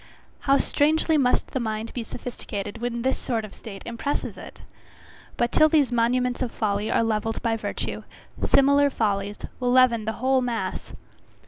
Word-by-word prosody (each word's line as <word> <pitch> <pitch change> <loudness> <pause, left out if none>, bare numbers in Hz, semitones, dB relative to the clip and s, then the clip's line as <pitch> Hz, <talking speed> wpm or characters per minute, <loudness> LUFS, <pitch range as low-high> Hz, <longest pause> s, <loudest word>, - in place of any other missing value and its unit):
How 275 - +6
strangely 315 +3 +2
must 260 -4 +2
the 265 - -1
mind 220 -1 -3
be 245 - -3
sophisticated 210 -4 -6
when 235 -1 -2
this 265 - 0
sort 225 -3 -2
of 210 - -12
state 195 -3 -10
impresses 235 +5 -3
it! - - -11 0.8
But 240 0 +1
till 310 - +5
these 290 -5 +3
monuments 245 +2 +1
of 250 -3 -1
folly 210 -1 -1
are - - +2
levelled 225 0 -1
by 230 -1 +1
virtue, 225 - -4 0.4
similar 280 +1 +4
follies 205 -4 -1 0.2
will 250 -1 +1
leaven 245 -3 +4
the 220 - -1
whole 260 +2 +2
mass. 240 -2 -3
240 Hz, 160 wpm, -25 LUFS, 220-260 Hz, 0.8 s, How